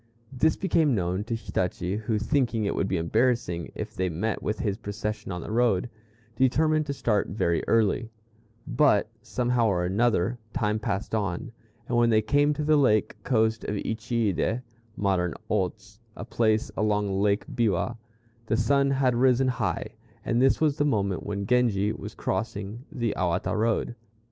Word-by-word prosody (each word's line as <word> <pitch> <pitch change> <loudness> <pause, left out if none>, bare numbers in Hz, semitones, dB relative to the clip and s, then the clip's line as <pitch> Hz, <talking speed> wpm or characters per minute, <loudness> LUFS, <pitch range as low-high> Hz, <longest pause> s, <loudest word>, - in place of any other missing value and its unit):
This 155 +5 +2
became 160 -8 +2
known 90 +1 -1
to 115 - -2
Hitachi, 90 -4 -2
who, 110 0 -1
thinking 115 -1 0
it 100 - 0
would 95 - 0
be 95 - 0
embarrassing 110 -1 0
if - - -5
they 95 0 -1
met 100 +7 -2
with 105 - -2
his 100 0 -2
procession 105 -1 -4
on 90 -1 -4
the - - -7
road, 120 -2 +1 0.4
determined 155 +5 +2
to 140 - -1
start 110 -6 0
very 85 -4 0
early; 115 +1 +2 0.6
but, 135 -8 +3
somehow 120 -2 0
or 90 -4 +1
another, 110 +2 +1
time 105 -4 0
passed 105 -1 -3
on, 100 0 -2 0.4
and 120 -3 +1
when 120 0 +4
they 110 -1 +3
came 145 +7 +3
to 150 - -2
the 155 0 +4
lake 110 -7 +2
coast 110 -2 +1
of 105 - -2
Uchiide 110 +1 -1 0.3
(modern 95 -4 0 0.2
Otz, 100 +1 -2 0.2
a 105 - -7
place 110 -2 +1
along 105 -2 0
Lake 100 0 +1
Biwa), 115 -1 0 0.5
the 110 - +1
sun 140 +4 +3
had 135 -2 +2
risen 130 +1 +3
high, 110 - -2 0.4
and 120 +1 +1
this 135 0 +4
was 150 -3 +2
the - - +2
moment 100 -10 0
when 100 -1 -3
Genji 110 -3 +2
was - - -8
crossing 105 +3 -4
the 120 -4 -1
Awata 90 +1 0
Road. 115 +2 0
110 Hz, 165 wpm, -26 LUFS, 100-125 Hz, 0.6 s, when